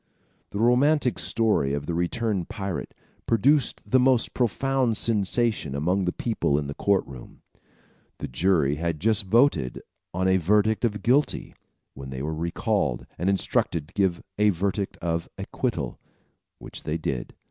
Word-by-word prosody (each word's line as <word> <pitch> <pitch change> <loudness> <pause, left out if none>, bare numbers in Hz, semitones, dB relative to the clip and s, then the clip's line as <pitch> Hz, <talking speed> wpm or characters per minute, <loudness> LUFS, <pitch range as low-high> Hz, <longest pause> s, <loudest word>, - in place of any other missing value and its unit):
] - - -41
The - - -5
romantic 125 +4 +3
story 105 -12 +1
of 70 0 -4
the 85 - -3
returned 95 +2 -1
pirate 100 -8 -5 0.3
produced 130 +4 +2
the 130 - +3
most 125 -2 +3
profound 125 0 +1
sensation 110 - 0
among 90 +6 0
the 90 - +1
people 105 -12 0
in 75 - -1
the 70 - -5
court 100 +5 +1
room. 65 -3 -12 0.7
The - - -5
jury 75 -1 +1
had 85 -1 -2
just 110 +4 +2
voted 95 - +2 0.3
on 95 +2 0
a 95 0 +4
verdict 105 +6 +2
of 105 -2 -2
guilty, 135 +5 +1 0.4
when 65 0 -9
they 65 0 -5
were 80 +2 -2
recalled, 85 - -1
and 90 +3 +1
instructed 85 -5 0
to - - -23
give 95 -4 0 0.2
a 105 0 +5
verdict 100 +2 -2
of 85 -1 -2
acquittal, - - -3 0.6
which - - -9
they 80 +1 -2
did. 65 -6 -4
95 Hz, 155 wpm, -25 LUFS, 80-115 Hz, 0.7 s, a